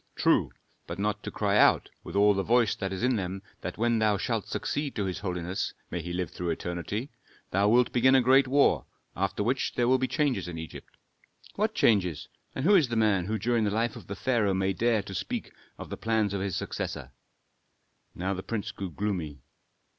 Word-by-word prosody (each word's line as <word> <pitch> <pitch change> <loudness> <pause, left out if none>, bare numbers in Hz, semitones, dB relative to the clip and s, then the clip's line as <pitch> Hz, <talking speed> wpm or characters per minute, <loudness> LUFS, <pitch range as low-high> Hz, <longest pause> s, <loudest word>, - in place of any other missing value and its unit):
"True; - - +3 0.4
but - - -5
not 105 +1 -1
to - - -5
cry 100 -1 0
out, - - +4
with - - -8
all 105 +1 +5
the 95 - 0
voice 115 +2 +3
that 95 -2 -4
is 95 +3 -4
in 125 -1 +2
them, 95 0 -4 0.2
that - - -5
when 115 +1 +2
thou 105 -2 +3
shalt - - -2
succeed 145 -1 -3
to 105 - -1
his 95 -2 -3
holiness 90 -1 -3 0.2
may 85 - -2
he 85 +2 -6
live 90 -2 -2
through 90 -1 -4
eternity! 85 - -3 0.4
thou 100 +2 +3
wilt 120 +2 +4
begin 130 +2 +4
a 130 - +6
great 130 +2 +5
war, 140 +2 +3 0.3
after 95 +2 -1
which 125 +4 -1
there 120 - +2
will 130 +1 +4
be 130 - 0
changes 145 - 0
in 85 -2 -6
Egypt." 80 0 -9 0.6
"What 215 +2 -1
changes? 90 -8 +2 0.3
And 135 - -2
who 205 - +6
is 170 -9 +5
the 120 - -3
man 105 -5 +2
who 110 +1 -1
during 115 +2 +1
the 105 - +2
life 115 +2 0
of - - -11
the 100 - -5
pharaoh 105 -3 +1
may 95 +1 +1
dare 115 0 +1
to 100 - -8
speak - - -4 0.2
of - - -9
the - - -4
plans 110 -3 0
of 100 - -2
his 95 -3 -2
successor?" - - -4 1.0
Now 95 +2 -2
the 95 - -4
prince 105 +1 -4
grew 95 -2 -5
gloomy. 85 -8 -3
105 Hz, 210 wpm, -28 LUFS, 95-120 Hz, 1.0 s, a